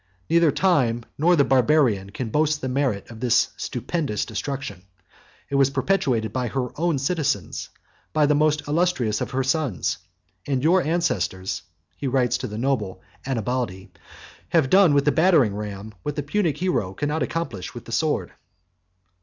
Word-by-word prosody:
neither 170 -2 +5
time 130 -10 +2
nor 175 +4 +4
the 145 - +5
Barbarian 125 -7 +3
can 115 +3 -5
boast 150 +2 +2
the 130 - -4
merit 125 -6 -1
of 115 - -10
this 120 0 +3
stupendous 130 -2 -2
destruction: 120 -3 -5 0.7
it - - -11
was 140 -1 +4
perpetrated 130 - 0
by 125 -1 -1
her 125 +1 -2
own 165 -1 +1
citizens, 140 - -1 0.4
by 150 - +3
the 145 - +3
most 150 0 +2
illustrious 145 -9 +1
of - - -2
her 135 0 -1
sons; 135 - -1 0.5
and 135 -2 0
your 180 +4 +4
ancestors 155 - -1 0.4
(he 140 - -3
writes 125 -2 +1
to - - -5
a 105 - -5
noble 115 -6 -1 0.3
Annabaldi) 120 -6 -2 0.6
have 155 -6 +2
done 185 -6 +6
with 140 - +3
the 150 - +4
battering 160 - +4
ram 105 0 -6
what 150 - -4
the 145 - -2
Punic 165 0 0
hero 125 - -1
could 145 - -2
not 155 +1 -1
accomplish 120 - -3
with - - -8
the - - -10
sword." - - 0
135 Hz, 160 wpm, -24 LUFS, 115-155 Hz, 0.7 s, done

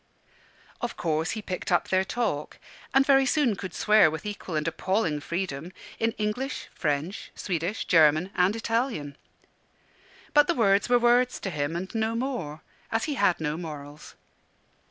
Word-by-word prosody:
Of 240 - -4
course 160 -1 0
he 215 - -5
picked 185 -2 -4
up 175 - +2
their 190 0 +3
talk, 190 -9 -2 0.3
and 270 0 +4
very 270 -1 +5
soon 255 -5 +2
could 185 -1 -6
swear 210 -1 +5
with 160 +6 -6
equal 205 -5 -5
and 155 +1 -1
appalling 170 -2 0
freedom 170 0 -4 0.3
in 225 0 +1
English, 220 +7 -3
French, 150 +7 -2
Swedish, 180 +2 -2
German, 160 +2 +4
and 180 +4 +3
Italian. 225 - -2 1.2
But 295 0 +6
the 345 - +1
words 200 -3 +3
were 245 - +6
words 245 +1 +3
to 195 - -3
him 150 0 -2
and 185 +2 -5
no 225 0 0
more, 230 - -3 0.3
as 225 - 0
he 305 - -1
had 200 -9 +2
no 155 -1 -2
morals. 150 -3 -8
190 Hz, 155 wpm, -27 LUFS, 160-230 Hz, 1.2 s, But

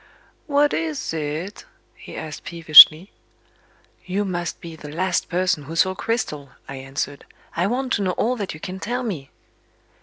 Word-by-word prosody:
"What 290 0 +2
is 160 -1 -3
it?" 155 +5 -5 0.3
he - - -12
asked 155 -1 -7
peevishly. 165 +2 +7 0.9
"You 190 +3 -2
must 175 -2 -4
be 165 -1 -10
the 150 -2 -11
last 180 +3 -1
person 175 -4 0
who 160 +4 -8
saw 185 +3 +2
Cristel," 185 - -3 0.2
I 135 - -7
answered. 135 +1 -5 0.3
"I 175 +3 +1
want 255 +3 -2
to - - 0
know 185 -2 0
all 245 +7 0
that 200 -7 -5
you - - -11
can 190 +2 -7
tell 245 +5 -3
me." 165 - -5
175 Hz, 160 wpm, -22 LUFS, 155-200 Hz, 0.9 s, peevishly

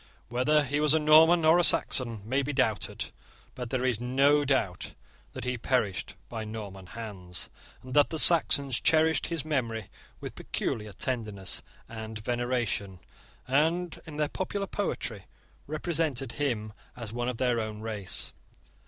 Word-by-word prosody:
Whether 145 +5 +2
he 145 +2 -1
was 150 0 +4
a - - +3
Norman 160 +2 +6
or 160 +2 +6
a - - +3
Saxon 115 -9 +3
may 130 +4 +1
be 140 +2 -3
doubted: 125 -6 -1 0.4
but 125 -2 -6
there 130 0 -1
is 120 -4 0
no 135 +4 +3
doubt 130 -10 -1 0.4
that - - -6
he 125 0 -2
perished 115 -7 -1
by 115 -2 -5
Norman 105 -4 -8
hands, 95 -5 -5 0.3
and 130 0 -8
that 145 -1 +5
the 160 - -3
Saxons 140 -6 +6
cherished 160 0 +3
his 165 -3 -3
memory 115 -8 -2 0.3
with - - -7
peculiar 105 -1 -3
tenderness 105 -5 -3 0.3
and 110 -1 -7
veneration, 120 -4 -2 0.5
and, 160 +6 +1
in 150 -2 -8
their 150 -1 +1
popular 195 +2 -3
poetry, 115 - -3 0.4
represented 155 -5 -1
him 115 -5 -2 0.2
as 115 -3 -7
one 120 +1 -2
of 125 - -4
their 125 -2 +1
own 110 -1 -5
race. 110 -4 -2
125 Hz, 150 wpm, -28 LUFS, 110-150 Hz, 0.5 s, Norman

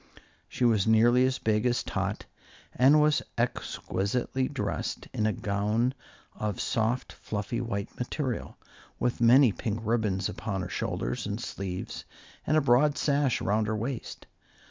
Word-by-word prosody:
She 125 - 0
was 110 -4 +3
nearly 120 +3 +5
as 130 0 -1
big 105 -1 +1
as 120 0 +1
Tot, - - -3 0.5
and 140 +4 +6
was 150 -1 +3 0.2
exquisitely 120 +1 -1
dressed - - -3
in 110 - +1
a - - +2
gown 105 +5 0 0.4
of 105 -3 -3
soft, 115 +3 -1
fluffy 105 +3 -4
white 105 -4 -4
material, 125 -1 -3 0.4
with 120 -1 -1
many 120 +1 +7
pink 110 +2 -3
ribbons 110 -4 0
upon 100 -4 -4
her 90 - -5
shoulders 60 -5 -3
and - - -3
sleeves, 95 -2 -5 0.4
and 155 - +3
a - - +4
broad 135 +3 +4
sash 140 -3 +1
around 105 +2 +1
her 110 0 -1
waist. 120 +3 -5
115 Hz, 145 wpm, -28 LUFS, 105-125 Hz, 0.5 s, many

